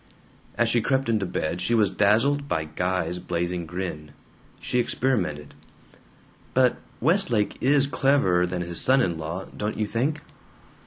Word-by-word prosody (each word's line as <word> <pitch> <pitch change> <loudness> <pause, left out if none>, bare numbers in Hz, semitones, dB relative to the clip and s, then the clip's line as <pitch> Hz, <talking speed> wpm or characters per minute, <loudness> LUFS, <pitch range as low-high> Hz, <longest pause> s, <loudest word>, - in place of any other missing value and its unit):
As 120 - +3
she 115 0 +2
crept 130 +1 0
into 105 -4 +1
bed 85 0 -3
she 115 +6 +1
was 105 -4 +3
dazzled 115 +9 +2
by 80 - 0
Guy's 90 +2 -2
blazing 85 0 -3
grin. 80 -4 -6 0.5
She 125 - -1
experimented: 105 - -1 1.0
"But 130 -1 +3 0.2
Westlake 155 - +1
is 140 +1 +4
cleverer 135 -11 +2
than 90 0 -3
his 85 -1 0
son 130 0 +4
in 85 -5 -2
law, 85 +4 -5
don't 105 +1 -3
you 110 - 0
think?" 135 +9 -1
105 Hz, 145 wpm, -25 LUFS, 90-130 Hz, 1.0 s, is